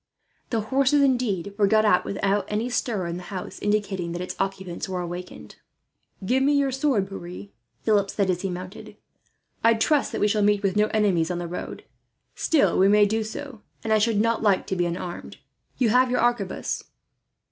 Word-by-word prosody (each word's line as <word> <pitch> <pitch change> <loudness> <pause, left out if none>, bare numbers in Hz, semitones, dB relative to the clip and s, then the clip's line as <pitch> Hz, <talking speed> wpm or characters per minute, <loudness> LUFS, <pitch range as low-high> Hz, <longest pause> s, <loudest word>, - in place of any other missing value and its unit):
The 225 -2 0
horses, 275 +5 +2
indeed, 220 -8 0
were 200 - +5
got 215 +1 +3
out 195 -4 +3
without 200 +1 0
any 215 +4 -2
stir 215 -6 -1
in 170 0 -4
the - - -7
house 185 -2 -6
indicating 200 -4 -1
that 175 - -4
its 180 - -6
occupants 195 -1 -3
were 185 -1 -2
awakened. 175 +1 -7 0.7
"Give 255 +6 +2
me 285 +2 +3
your 280 -1 +2
sword, 260 -7 +1
Pierre," 175 - -8 0.3
Philip 205 -3 +2
said, 200 -1 0
as 180 -1 -3
he 195 - -2
mounted. 185 +3 -8 0.7
"I 230 0 +5
trust 280 +6 +1
that - - -3
we 210 - +4
shall 210 0 +1
meet 205 0 +2
with 195 -2 +1
no 210 0 +3
enemies 195 -7 +1
on 180 - -2
the 175 0 -4
road; 175 - -6 0.5
still 315 -4 +2
we 190 - +6
may 205 +1 +5
do 220 +2 0
so, 230 +2 -7 0.2
and 220 - +1
I 215 - +4
should 215 -1 +2
not 230 +1 +1
like 205 -4 +2
to 190 - -2
be 175 -1 +1
unarmed. 175 0 -6 0.4
You 245 -3 +2
have 250 +3 +4
your 250 - +1
arquebus." 240 -5 -1
205 Hz, 195 wpm, -25 LUFS, 185-230 Hz, 0.7 s, we